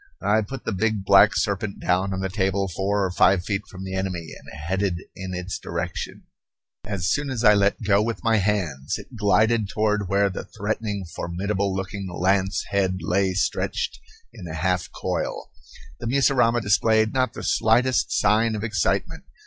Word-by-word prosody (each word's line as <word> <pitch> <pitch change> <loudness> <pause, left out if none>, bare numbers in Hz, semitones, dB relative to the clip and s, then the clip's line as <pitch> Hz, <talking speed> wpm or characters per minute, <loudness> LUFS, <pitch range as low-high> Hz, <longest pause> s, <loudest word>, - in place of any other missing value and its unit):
I 105 +2 +3
put 130 +6 -7
the - - -1
big 110 0 -1
black 100 0 +6
serpent 100 0 -1
down 95 +2 +1
on 95 0 -3
the 95 - -1
table 95 0 0
four 95 +3 0
or 95 - -2
five 90 0 +3
feet 100 0 -2
from 95 0 -9
the 95 0 -6
enemy 90 -4 -3
and - - -12
headed 95 +3 -1 0.2
in 95 -1 -5
its 90 +1 -4
direction. 85 +1 -5 0.6
As 95 -1 -2
soon 150 -1 0
as 125 -3 -3
I 105 -2 +7
let 100 +1 +2
go 100 0 +3
with 115 +1 -3
my 115 -1 +3
hands 90 -9 -1
it 130 - -12
glided 110 0 +2
toward 105 -2 0
where 100 +1 +2
the - - -5
threatening, 105 -1 -2
formidable 95 +4 -2
looking 95 0 -4
lance 95 +2 +1
head 95 -2 +1
lay 95 +2 +1
stretched 90 - -1 0.3
in 90 - -9
a 80 - -6
half 90 +2 0
coil. - - -3 0.5
The 120 - -4
mussurama 125 -2 +3
displayed 110 +1 +3
not 130 -1 +1
the - - -7
slightest 120 +3 +2
sign 110 +2 +2
of 105 - -4
excitement. 105 -7 -1
100 Hz, 175 wpm, -24 LUFS, 95-110 Hz, 0.6 s, I